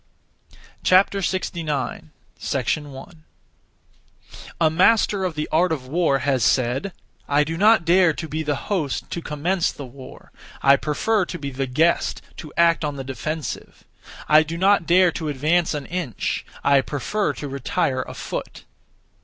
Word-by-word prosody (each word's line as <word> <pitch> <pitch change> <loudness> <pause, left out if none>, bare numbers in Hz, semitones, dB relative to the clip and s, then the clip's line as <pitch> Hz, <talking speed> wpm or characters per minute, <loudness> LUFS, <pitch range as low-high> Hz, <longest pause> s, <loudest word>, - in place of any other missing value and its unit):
69. 185 -7 0 0.3
1. 145 +4 -3 1.4
A 160 -2 +4
master 200 +3 +3
of 180 -4 -2
the 150 0 -2
art 170 +2 +3
of 140 -5 -3
war 155 -1 +2
has 135 -2 0
said, 130 +9 +1 0.4
'I 145 +1 +4
do 160 +2 -4
not 210 0 +4
dare 180 0 +5
to 160 +1 -6
be 155 +1 -3
the 150 -2 -1
host 155 -3 -3
(to 170 - -3
commence 165 +4 -1
the 140 - -9
war); 130 +1 -13 0.3
I 140 0 +7
prefer 180 +9 0
to 175 - -6
be 140 -3 -5
the 135 +1 -3
guest 160 +7 +1
(to 155 - -9
act 170 -1 +4
on 145 -1 -2
the 135 - -5
defensive). 140 +4 -5 0.4
I 155 +1 +7
do 160 +2 -4
not 190 -1 +3
dare 180 0 +5
to 155 -1 -4
advance 155 +4 +1
an 145 -2 -5
inch; 170 - -3 0.2
I 140 -1 +4
prefer 175 - -2
to 145 - -6
retire 135 -1 -1
a - - -8
foot.' - - -6
155 Hz, 150 wpm, -22 LUFS, 140-175 Hz, 1.4 s, I